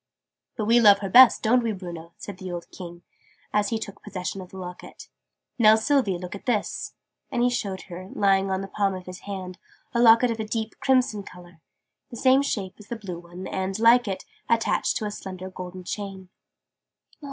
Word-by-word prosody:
"But 215 Hz, -, -1 dB
we 230 Hz, +2 st, +5 dB
love 205 Hz, -3 st, +7 dB
her 195 Hz, -2 st, -4 dB
best, 255 Hz, +2 st, +8 dB
don't 240 Hz, +3 st, +4 dB
we, 230 Hz, -2 st, -1 dB
Bruno?" 170 Hz, -3 st, -8 dB
said 200 Hz, -3 st, -9 dB
the 185 Hz, -1 st, -6 dB
old 175 Hz, -1 st, -7 dB
King, 175 Hz, -1 st, -10 dB, 0.5 s
as 210 Hz, -1 st, +2 dB
he 225 Hz, -, 0 dB
took 210 Hz, -2 st, -8 dB
possession 195 Hz, -1 st, -5 dB
of 180 Hz, -, -11 dB
the 190 Hz, -, -11 dB
Locket. 180 Hz, -1 st, -9 dB, 0.5 s
"Now, 215 Hz, -1 st, +7 dB
Sylvie, 220 Hz, -4 st, +1 dB
look 180 Hz, 0 st, -7 dB
at 200 Hz, -, -10 dB
this." 220 Hz, -4 st, -1 dB, 0.4 s
And 240 Hz, -, +1 dB
he 245 Hz, -, +3 dB
showed 195 Hz, -6 st, -3 dB
her, 185 Hz, +1 st, -9 dB
lying 195 Hz, -1 st, +2 dB
on 190 Hz, 0 st, -1 dB
the 195 Hz, -, -5 dB
palm 195 Hz, -1 st, 0 dB
of 185 Hz, -1 st, -8 dB
his 185 Hz, 0 st, -8 dB
hand, 185 Hz, -2 st, -6 dB, 0.3 s
a 235 Hz, -, +1 dB
Locket 230 Hz, +1 st, +6 dB
of 225 Hz, -, -4 dB
a -, -, -1 dB
deep 220 Hz, 0 st, -3 dB
crimson 255 Hz, -6 st, +2 dB
colour, 180 Hz, -3 st, -14 dB, 0.5 s
the 235 Hz, -, -8 dB
same 260 Hz, +2 st, +5 dB
shape 200 Hz, -9 st, -2 dB
as 210 Hz, -, -14 dB
the 235 Hz, -, -4 dB
blue 190 Hz, -6 st, -7 dB
one 175 Hz, +2 st, -10 dB
and, 190 Hz, +1 st, -3 dB
like 230 Hz, +1 st, +5 dB
it, 190 Hz, -1 st, -4 dB, 0.2 s
attached 230 Hz, -1 st, +1 dB
to 215 Hz, -, -3 dB
a 210 Hz, -, -3 dB
slender 185 Hz, -2 st, -7 dB
golden 185 Hz, 0 st, -8 dB
chain. 190 Hz, -1 st, -6 dB
195 Hz, 200 wpm, -25 LUFS, 185-225 Hz, 0.5 s, best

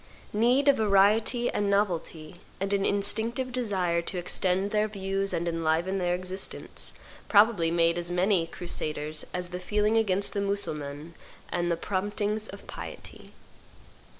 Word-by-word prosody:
Need 245 Hz, +6 st, +3 dB
of 280 Hz, -, +6 dB
variety 215 Hz, +4 st, +3 dB
and 205 Hz, -1 st, 0 dB
novelty, 175 Hz, -5 st, -1 dB, 0.2 s
and 195 Hz, +1 st, -1 dB
an 200 Hz, -1 st, +2 dB
instinctive 225 Hz, +5 st, 0 dB
desire 190 Hz, -9 st, 0 dB
to 180 Hz, +2 st, -4 dB
extend 185 Hz, +2 st, 0 dB
their 215 Hz, 0 st, +2 dB
views 195 Hz, -1 st, -2 dB
and 170 Hz, +1 st, -1 dB
enliven 165 Hz, +3 st, 0 dB
their 175 Hz, -1 st, +1 dB
existence, 185 Hz, +1 st, -3 dB, 0.4 s
probably 205 Hz, -5 st, +5 dB
made 170 Hz, 0 st, +2 dB
as 175 Hz, 0 st, -2 dB
many 180 Hz, -1 st, +2 dB
crusaders 155 Hz, -3 st, -3 dB
as 180 Hz, 0 st, -4 dB
the 180 Hz, 0 st, -5 dB
feeling 210 Hz, +4 st, +1 dB
against 200 Hz, -3 st, +2 dB
the 200 Hz, -, -1 dB
Mussulmans 155 Hz, -6 st, -3 dB, 0.4 s
and 175 Hz, -1 st, 0 dB
the 170 Hz, -, +1 dB
promptings 205 Hz, +3 st, -2 dB
of 200 Hz, -, -10 dB
piety. -, -, -9 dB
195 Hz, 140 wpm, -28 LUFS, 175-210 Hz, 0.4 s, of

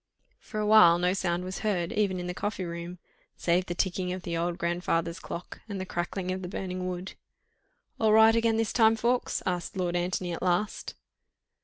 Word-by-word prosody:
For 215 Hz, -, -6 dB
a 210 Hz, -, 0 dB
while 210 Hz, -6 st, +7 dB
no 180 Hz, +1 st, +1 dB
sound 180 Hz, -2 st, -1 dB
was 185 Hz, 0 st, -5 dB
heard, 185 Hz, -6 st, -1 dB
even 200 Hz, -3 st, 0 dB
in 175 Hz, -, -4 dB
the 180 Hz, -, -3 dB
coffee 205 Hz, +1 st, -3 dB
room, 170 Hz, +1 st, -6 dB, 0.4 s
save 180 Hz, +2 st, +1 dB
the 175 Hz, -, -3 dB
ticking 180 Hz, 0 st, -1 dB
of 185 Hz, -1 st, -6 dB
the 170 Hz, -, -3 dB
old 170 Hz, +1 st, -1 dB
grandfather's 170 Hz, -1 st, -1 dB
clock 175 Hz, -, -8 dB
and 200 Hz, -1 st, -4 dB
the 185 Hz, -, -3 dB
crackling 180 Hz, +1 st, -3 dB
of 185 Hz, 0 st, -3 dB
the 180 Hz, -, -5 dB
burning 185 Hz, -1 st, -4 dB
wood. 180 Hz, +1 st, -5 dB, 0.9 s
"All 220 Hz, -1 st, +3 dB
right 220 Hz, +1 st, +7 dB
again 230 Hz, -1 st, +2 dB
this 225 Hz, -2 st, 0 dB
time, 225 Hz, -2 st, +5 dB
Ffoulkes?" 240 Hz, +2 st, 0 dB
asked 180 Hz, +1 st, -2 dB
Lord 175 Hz, -1 st, -1 dB
Antony 175 Hz, 0 st, -1 dB
at -, -, -5 dB
last. 180 Hz, +3 st, -1 dB
185 Hz, 195 wpm, -28 LUFS, 175-205 Hz, 0.9 s, while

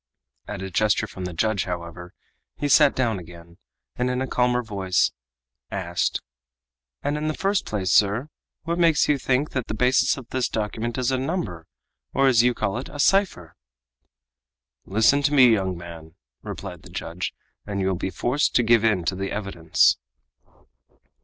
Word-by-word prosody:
At 100 Hz, -2 st, -5 dB
a 95 Hz, -, -6 dB
gesture 105 Hz, +3 st, +2 dB
from 95 Hz, -, -7 dB
the 90 Hz, -, -5 dB
judge, 110 Hz, +3 st, 0 dB
however, 90 Hz, 0 st, -7 dB, 0.4 s
he 145 Hz, -, -1 dB
sat 145 Hz, 0 st, +5 dB
down 115 Hz, -6 st, 0 dB
again, 85 Hz, 0 st, -14 dB, 0.4 s
and 125 Hz, +1 st, 0 dB
in 125 Hz, 0 st, -1 dB
a 130 Hz, -, -1 dB
calmer 125 Hz, -1 st, +1 dB
voice 95 Hz, -4 st, 0 dB, 0.6 s
asked: -, -, -2 dB, 0.8 s
"And 145 Hz, +1 st, -1 dB
in 155 Hz, -, -2 dB
the 155 Hz, -, -1 dB
first 195 Hz, +1 st, 0 dB
place, 95 Hz, -3 st, -1 dB
sir, 105 Hz, +10 st, +3 dB, 0.3 s
what 170 Hz, +2 st, -2 dB
makes 165 Hz, -3 st, +4 dB
you 145 Hz, -2 st, +2 dB
think 130 Hz, +3 st, 0 dB
that 130 Hz, -3 st, -3 dB
the -, -, -3 dB
basis 125 Hz, +5 st, +3 dB
of 130 Hz, -4 st, -9 dB
this 130 Hz, -1 st, -1 dB
document 110 Hz, +2 st, -3 dB
is 130 Hz, 0 st, 0 dB
a 130 Hz, -, 0 dB
number, 135 Hz, -, -3 dB, 0.5 s
or, 135 Hz, -, +4 dB
as 125 Hz, -4 st, +5 dB
you 125 Hz, 0 st, +2 dB
call 105 Hz, +2 st, -1 dB
it, 130 Hz, -, -8 dB
a 145 Hz, -, -9 dB
cipher?" 160 Hz, -, +1 dB, 1.3 s
"Listen 110 Hz, +8 st, +3 dB
to 145 Hz, +1 st, +1 dB
me, 130 Hz, -3 st, +8 dB
young 95 Hz, -4 st, -1 dB
man," 85 Hz, -1 st, -11 dB, 0.3 s
replied -, -, -7 dB
the -, -, -14 dB
judge, 85 Hz, +2 st, -4 dB, 0.4 s
"and 100 Hz, -1 st, -3 dB
you 95 Hz, -, 0 dB
will 95 Hz, -, +1 dB
be 95 Hz, +1 st, -3 dB
forced 125 Hz, +10 st, 0 dB
to 125 Hz, -, +4 dB
give 115 Hz, -1 st, +4 dB
in 105 Hz, -6 st, +2 dB
to -, -, 0 dB
the 95 Hz, +1 st, -4 dB
evidence." 95 Hz, -6 st, +2 dB
110 Hz, 175 wpm, -24 LUFS, 95-130 Hz, 1.3 s, me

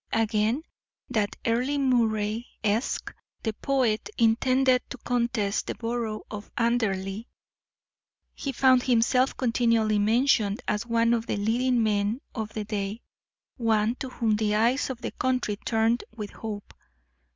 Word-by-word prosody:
Again, 225 Hz, +5 st, +1 dB, 0.5 s
that 215 Hz, -4 st, 0 dB
Earle 250 Hz, +5 st, +1 dB
Moray, 230 Hz, -4 st, +1 dB, 0.2 s
Esq., 215 Hz, +4 st, -1 dB, 0.3 s
the 220 Hz, -, -1 dB
poet, 255 Hz, -, 0 dB
intended 255 Hz, +3 st, +3 dB
to -, -, -6 dB
contest 235 Hz, -4 st, -1 dB
the -, -, -3 dB
borough 230 Hz, -2 st, -3 dB
of 210 Hz, -1 st, -7 dB
Anderley. 220 Hz, -3 st, 0 dB, 1.1 s
He 275 Hz, -, -4 dB
found 255 Hz, 0 st, +4 dB
himself 250 Hz, +2 st, +2 dB
continually 230 Hz, -3 st, +2 dB
mentioned 220 Hz, -1 st, +2 dB
as 210 Hz, +2 st, -1 dB
one 230 Hz, 0 st, +3 dB
of 230 Hz, -1 st, -1 dB
the -, -, -1 dB
leading 235 Hz, +3 st, +1 dB
men 210 Hz, +2 st, +1 dB
of 220 Hz, -3 st, -4 dB
the 215 Hz, -, -2 dB
day, 205 Hz, +1 st, -3 dB, 0.5 s
one 225 Hz, -2 st, +2 dB
to 265 Hz, -, -5 dB
whom 225 Hz, -4 st, 0 dB
the 210 Hz, -1 st, +1 dB
eyes 235 Hz, +7 st, +2 dB
of 250 Hz, -2 st, -5 dB
the -, -, -4 dB
country 255 Hz, -5 st, -1 dB
turned 225 Hz, +2 st, +1 dB
with 210 Hz, -2 st, -5 dB
hope. 210 Hz, -2 st, -7 dB
230 Hz, 135 wpm, -27 LUFS, 215-245 Hz, 1.1 s, found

